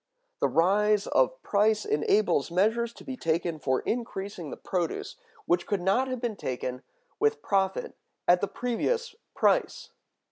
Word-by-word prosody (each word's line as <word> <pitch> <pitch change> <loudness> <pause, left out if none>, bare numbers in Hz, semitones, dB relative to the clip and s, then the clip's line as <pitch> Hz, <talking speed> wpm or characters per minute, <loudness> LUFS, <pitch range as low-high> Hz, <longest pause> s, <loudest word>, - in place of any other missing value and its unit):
The - - +3
rise 205 +4 +3
of - - +1
price 215 +1 +2
enables 150 0 +2
measures 225 +7 +1
to - - -13
be 265 - -5
taken 165 -4 -1
for 130 -3 0
increasing 200 -8 -4
the - - -7
produce, 175 -3 -3 0.3
which 175 0 +1
could 205 - 0
not 195 +9 +2
have 255 -1 -3
been 230 -4 -3
taken 125 0 -4 0.4
with 440 0 +1
profit 190 -1 0 0.3
at 180 0 +5
the 200 - +1
previous 460 - -1 0.2
price. - - +1
200 Hz, 145 wpm, -28 LUFS, 175-235 Hz, 0.4 s, at